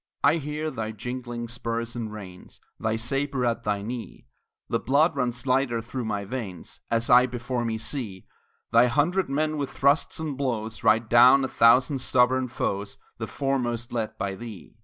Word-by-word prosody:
I 145 +4 +5
hear 150 +1 -3
thy 110 -3 -4
jingling 120 +1 -5
spurs 115 0 -4
and 115 -3 -4
reins, 95 -4 -11 0.2
Thy 110 0 0
sabre 135 +3 -1
at 115 0 -1
thy 100 -1 -1
knee; 115 +1 -7 0.4
The 115 - 0
blood 145 +4 +3
runs 125 -1 -2
lighter 130 -2 +1
through 120 +2 -5
my 105 -2 -2
veins, 100 -6 -6
As 115 0 +1
I 125 +1 +7
before 120 0 -3
me 115 -1 -1
see 110 -6 -4 0.5
Thy 120 +2 +6
hundred 155 +9 +1
men 155 +2 0
with 140 -2 -2
thrusts 140 +4 +1
and 155 -3 -3
blows 115 -5 -3
Ride 110 +1 +4
down 125 +4 +7
a - - 0
thousand 130 +3 +4
stubborn 130 0 +2
foes, 100 -4 -3 0.2
The - - -3
foremost 120 -4 -2
led 115 -2 -3
by 100 -2 -2
thee. 105 -2 -9
120 Hz, 170 wpm, -26 LUFS, 115-135 Hz, 0.5 s, I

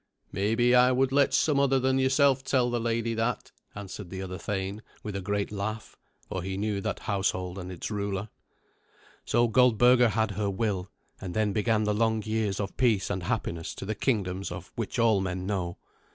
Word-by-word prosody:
"Maybe 115 +5 +2
I 125 +1 +6
would 130 +1 +2
let 140 0 +3
some 150 -3 +3
other 135 -1 +3
than 130 +1 +2
yourself 130 0 +3
tell 125 -3 +1
the 120 - 0
lady 115 0 -1
that," 115 +2 -2 0.2
answered 100 -2 -7
the 95 +1 -5
other 90 0 -6
thane 100 +1 -3 0.2
with 105 -2 -5
a 100 - -2
great 100 +1 -2
laugh, 105 +1 -4 0.3
for 95 - -4
he 95 +2 -4
knew 105 -1 -1
that - - -3
household 95 -2 -1
and 90 0 -6
its 90 +4 -6
ruler. 100 0 -3 1.0
So 120 +1 +3
Goldberga 125 +1 +5
had 110 0 0
her 100 +1 -1
will, 95 -2 -2 0.3
and 90 -2 -6
then 110 -2 +1
began 110 +1 +1
the 105 0 +1
long 110 0 +1
years 110 -2 -1
of 100 -2 -4
peace 115 -7 +2
and 95 - -2
happiness 90 -5 -3
to - - -7
the 110 - -2
kingdoms 100 -5 -1
of - - -8
which - - -4
all 110 -4 +4
men 90 -1 -3
know. 90 -3 -2
105 Hz, 190 wpm, -28 LUFS, 95-120 Hz, 1.0 s, I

